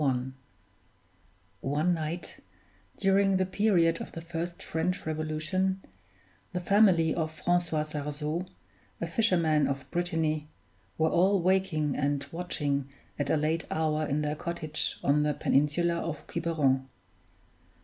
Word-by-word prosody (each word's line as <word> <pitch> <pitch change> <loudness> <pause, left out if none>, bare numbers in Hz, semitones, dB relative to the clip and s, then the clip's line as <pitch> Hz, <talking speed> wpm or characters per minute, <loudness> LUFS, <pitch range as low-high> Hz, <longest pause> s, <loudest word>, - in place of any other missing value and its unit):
One 150 +6 +1
night, 165 +1 -4 0.6
during 195 0 +3
the 185 - +2
period 185 -4 +2
of - - -7
the 165 - -6
first 170 +1 -5
French 180 +4 -2
Revolution, 155 +5 -1 0.7
the 180 - 0
family 180 -4 +4
of 160 -2 -1
Francois 170 -1 0
Sarzeau, 150 +3 -3 0.5
a - - -1
fisherman 170 -9 +2
of 140 -1 -3
Brittany, 160 -3 0 0.5
were 160 0 +2
all 190 +3 +4
waking 180 -5 +1
and 140 -1 0
watching 145 -5 -2 0.3
at 145 -1 -1
a 160 - +3
late 155 +1 0
hour 155 -1 0
in 150 0 0
their 150 0 -1
cottage 160 -1 -3
on 145 +1 +3
the 150 -1 +1
peninsula 160 +5 +2
of 165 -3 -4
Quiberon. 145 -6 0
160 Hz, 120 wpm, -29 LUFS, 150-175 Hz, 0.7 s, family